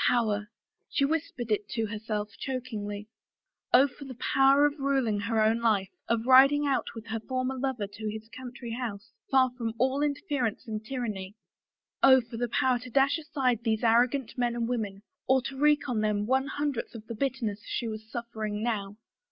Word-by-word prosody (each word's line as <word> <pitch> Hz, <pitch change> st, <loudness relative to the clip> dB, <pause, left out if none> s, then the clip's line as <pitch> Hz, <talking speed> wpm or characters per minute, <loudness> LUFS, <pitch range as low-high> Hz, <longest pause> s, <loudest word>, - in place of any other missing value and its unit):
Power! 215 Hz, -3 st, +1 dB, 0.4 s
She 275 Hz, -, +2 dB
whispered 280 Hz, -6 st, -2 dB
it 205 Hz, -1 st, 0 dB
to 225 Hz, -2 st, 0 dB
herself 210 Hz, 0 st, -3 dB
chokingly. 215 Hz, -6 st, -4 dB, 0.6 s
Oh, 265 Hz, +3 st, +7 dB
for 280 Hz, +2 st, -12 dB
the 260 Hz, -2 st, -8 dB
power 270 Hz, +3 st, +4 dB
of 295 Hz, +1 st, 0 dB
ruling 270 Hz, -6 st, +1 dB
her 220 Hz, +2 st, 0 dB
own 220 Hz, +2 st, +3 dB
life, 210 Hz, -5 st, +2 dB, 0.2 s
of 230 Hz, 0 st, 0 dB
riding 275 Hz, +3 st, +7 dB
out 275 Hz, -2 st, +1 dB
with 225 Hz, -1 st, -8 dB
her 225 Hz, 0 st, -3 dB
lover 260 Hz, 0 st, -1 dB
forth -, -, -27 dB
to 215 Hz, 0 st, -3 dB
his 220 Hz, +1 st, -7 dB
country 245 Hz, -1 st, -8 dB
home, 235 Hz, -5 st, -3 dB, 0.3 s
far 260 Hz, -2 st, +4 dB
from 230 Hz, -2 st, -3 dB
all 265 Hz, +4 st, +1 dB
inter 290 Hz, -1 st, 0 dB
ference 255 Hz, -6 st, -1 dB
and 215 Hz, -1 st, -4 dB
tyranny! 215 Hz, -6 st, -4 dB, 0.7 s
Oh, 260 Hz, -1 st, +8 dB
for 230 Hz, -1 st, -8 dB
the 240 Hz, 0 st, -1 dB
power 255 Hz, +1 st, +2 dB
to 250 Hz, +1 st, -9 dB
dash 275 Hz, +5 st, +3 dB
aside 265 Hz, -6 st, 0 dB
these 220 Hz, -1 st, 0 dB
arrogant 240 Hz, +2 st, +3 dB
men 240 Hz, -1 st, +1 dB
and 235 Hz, -1 st, -1 dB
women, 210 Hz, -5 st, -3 dB, 0.2 s
or 265 Hz, 0 st, +5 dB
to 270 Hz, -, -5 dB
wreak 295 Hz, +1 st, +3 dB
on 235 Hz, -4 st, 0 dB
them 210 Hz, -1 st, 0 dB
one 265 Hz, +4 st, +1 dB
hundredth 285 Hz, -4 st, -3 dB
of 220 Hz, -1 st, -9 dB
the 230 Hz, -, -6 dB
bitterness 230 Hz, -4 st, -2 dB
that -, -, -19 dB
she 235 Hz, -, -2 dB
was 220 Hz, 0 st, -6 dB
suffering 220 Hz, -3 st, -4 dB
now 205 Hz, -3 st, -2 dB
240 Hz, 190 wpm, -28 LUFS, 215-265 Hz, 0.7 s, Oh